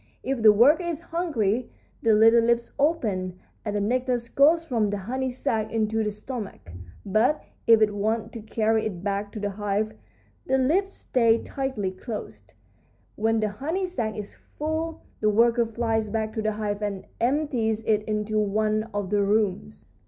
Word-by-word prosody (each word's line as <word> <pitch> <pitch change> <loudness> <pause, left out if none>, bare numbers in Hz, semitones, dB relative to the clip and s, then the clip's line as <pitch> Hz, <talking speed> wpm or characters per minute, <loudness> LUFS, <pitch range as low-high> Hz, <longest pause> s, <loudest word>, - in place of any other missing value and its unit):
If 265 -2 -2
the 220 -1 +8
worker 260 - +5
is 340 -3 -3
hungry 255 - -1 0.3
the 225 -2 +4
little 225 +2 +6
lips 235 0 +1
open, 210 - 0 0.3
and 210 -2 -3
the - - +1
nectar 250 +4 +1 0.2
goes 320 +4 +5
from 230 -8 0
the 205 - -2
honey 260 +7 -3
sac 225 -3 -2
into 220 0 0
the 210 - 0
stomach. 210 - -7 0.3
But 220 +9 +2 0.2
if 225 -1 +7
it 210 -1 +1
wants 215 +2 -1
to 230 - -7
carry 220 0 0
it 185 -4 -7
back 200 0 -2
to 215 - -5
the 205 0 -2
hive 205 +1 -1 0.5
the 265 - +3
lips 345 +10 +2
stay 230 -10 +2
tightly 260 -9 -3
closed. 210 +4 -8 0.6
When 225 +1 +1
the 215 - +1
honey 315 - -2
sac 230 - -3
is 205 -1 -6
full 315 +2 -4 0.2
the 215 - +2
worker 230 +2 +3
flies 225 -1 -1
back 220 0 -2
to 220 - -2
the 215 0 0
hive 210 -1 -3
and 200 -2 -3
empties 240 -5 0
it 215 -1 +2
into 215 0 -1
one 215 +1 0
of 205 -2 -2
the 205 -1 +3
rooms. 195 - 0
220 Hz, 170 wpm, -25 LUFS, 210-255 Hz, 0.6 s, the